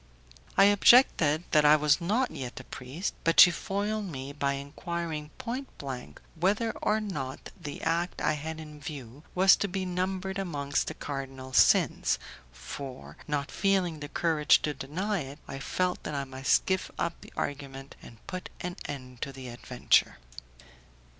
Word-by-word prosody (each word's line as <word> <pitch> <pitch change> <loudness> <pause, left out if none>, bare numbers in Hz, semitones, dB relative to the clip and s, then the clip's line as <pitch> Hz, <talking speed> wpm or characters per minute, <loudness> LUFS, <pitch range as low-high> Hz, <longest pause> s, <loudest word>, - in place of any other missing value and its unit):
I - - +8
objected 200 - +6
that 150 -1 +5
I 150 +1 +8
was 150 +2 +3
not 225 +9 +1
yet 125 -2 -6
a - - -9
priest, 135 +10 -5
but 165 - +3
she 175 - +11
foiled 205 +4 -2
me 140 -5 -6
by 140 -1 0
enquiring 155 +2 -4
point 260 +2 -4
blank 130 -3 -7
whether 200 +7 +1
or 215 - +2
not 145 -11 -5
the 145 -1 -7
act 170 +2 0
I - - +2
had 160 +2 -5
in 150 -1 -10
view 140 -3 -8
was 190 +1 +7
to 205 - -1
be 190 0 -3
numbered 190 +1 -2
amongst 145 -6 -1
the - - -4
cardinal 135 -2 -6
sins, - - +4 0.3
for, 130 - -8
not 145 -2 -2
feeling 190 -5 +1
the 145 0 -7
courage 155 -2 +3
to 150 - 0
deny 170 +10 -2
it, 140 -1 -7
I 135 - -6
felt 180 +5 -1
that 150 - -5
I 140 - -1
must 130 0 +1
give 190 0 0
up 170 - -2
the - - -13
argument 135 -1 -5
and 115 -1 -14
put 185 0 -6
an 180 0 -5
end 130 -3 -8
to 140 - -3
the 130 -2 -9
adventure. 120 +1 +1
150 Hz, 165 wpm, -29 LUFS, 140-185 Hz, 0.3 s, she